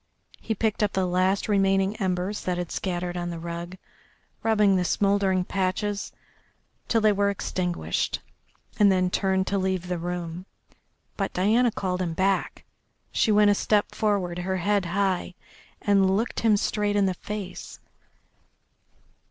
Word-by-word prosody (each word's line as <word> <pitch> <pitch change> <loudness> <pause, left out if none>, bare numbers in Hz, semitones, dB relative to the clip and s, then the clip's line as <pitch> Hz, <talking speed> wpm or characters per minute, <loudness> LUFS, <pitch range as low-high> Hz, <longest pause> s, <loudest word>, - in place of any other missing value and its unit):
He 220 - -3
picked 220 +1 -1
up 210 -1 +1
the 190 -1 +1
last 185 +2 +1
remaining 195 -1 +2
embers 185 +1 -1
that 180 -1 -1
had 175 -2 -4
scattered 180 -1 -3
on 175 0 -3
the 170 - -5
rug, 170 +2 -6 0.6
rubbing 210 -3 +3
the 180 - +2
smouldering 195 -1 +1
patches 195 +2 -2 0.8
till 225 - +2
they 215 0 +5
were 200 0 +2
extinguished, 180 -3 -2 0.6
and 205 -2 +6
then 185 -1 +1
turned 190 -1 +1
to 200 0 0
leave 185 -1 -1
the 180 -1 -2
room. 175 +1 -5 0.7
But 195 -1 -2
Diana 220 +7 +3
called 185 -4 -2
him 170 -3 -2
back. 190 +2 0 0.5
She 220 - +2
went 210 0 +5
a - - +5
step 205 +1 +1
forward, 190 -5 0
her 190 +1 -1
head 200 +1 +1
high, 185 0 -1 0.5
and 195 -1 +3
looked 225 +2 -2
him 220 -2 +3
straight 205 0 0
in 200 -1 +3
the 190 - +1
face. 200 0 -7
190 Hz, 150 wpm, -26 LUFS, 180-205 Hz, 0.8 s, and